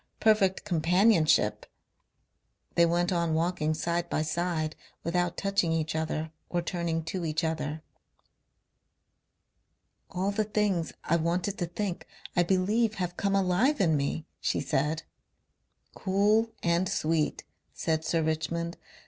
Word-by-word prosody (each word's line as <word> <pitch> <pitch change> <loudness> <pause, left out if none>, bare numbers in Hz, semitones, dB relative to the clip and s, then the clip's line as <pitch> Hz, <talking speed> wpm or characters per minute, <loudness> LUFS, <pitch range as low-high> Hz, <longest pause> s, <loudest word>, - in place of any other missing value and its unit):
perfect 210 -4 +3
companionship...." 180 0 +3 1.1
They 170 0 +5
went 175 +2 +1
on 170 -3 +1
walking 160 -2 0
side 170 +2 -1
by 155 - 0
side, 155 0 -1 0.3
without 175 +1 0
touching 195 -4 +1
each 160 -1 -1
other 160 0 -2 0.2
or 175 -1 -1
turning 170 -2 -2
to 175 +2 -4
each 155 +1 -1
other. 155 -1 -2 2.3
"All 190 +3 -1
the 215 +1 +1
things 205 -5 0
I 170 - +2
wanted 175 +4 -1
to 175 - -1
think 180 +1 -4 0.3
I 175 - +5
believe 205 +5 +2
have 180 -3 -3
come 200 +1 0
alive 195 +10 +2
in 165 -5 +3
me," 145 +2 -1
she - - 0
said.... 150 +4 0 0.9
"Cool 210 +4 +2
and 170 +2 +2
sweet," 155 -1 0 0.3
said 160 -1 -1
Sir 160 0 +1
Richmond. 165 +2 -2
170 Hz, 125 wpm, -29 LUFS, 160-190 Hz, 2.3 s, They